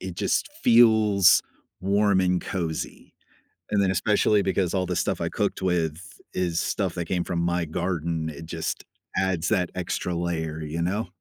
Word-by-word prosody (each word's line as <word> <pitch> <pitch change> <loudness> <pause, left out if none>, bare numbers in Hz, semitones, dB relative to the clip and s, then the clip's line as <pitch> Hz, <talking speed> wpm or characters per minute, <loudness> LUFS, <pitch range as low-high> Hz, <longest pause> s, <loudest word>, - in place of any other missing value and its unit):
it - - -6
just - - 0
feels 110 -5 +6 0.4
warm 100 +1 +3
and 90 -1 +1
cozy. 85 -4 -5 0.6
And 100 -1 +3
then 95 - +2
especially 105 +2 +2
because 95 -2 0
all 95 -1 +1
the - - -2
stuff - - 0
I - - 0
cooked - - -2
with 85 -4 0 0.3
is 85 -2 0
stuff 95 -4 -1
that 85 - -3
came 90 +1 -1
from 85 - -2
my 85 0 0
garden, 85 -1 -2
it 80 +1 -9
just 80 0 -4 0.3
adds 95 -4 0
that 90 -1 +1
extra 90 0 -2
layer, 80 -2 -2
you 80 +2 -4
know? 95 +5 -1
90 Hz, 165 wpm, -25 LUFS, 85-95 Hz, 0.6 s, feels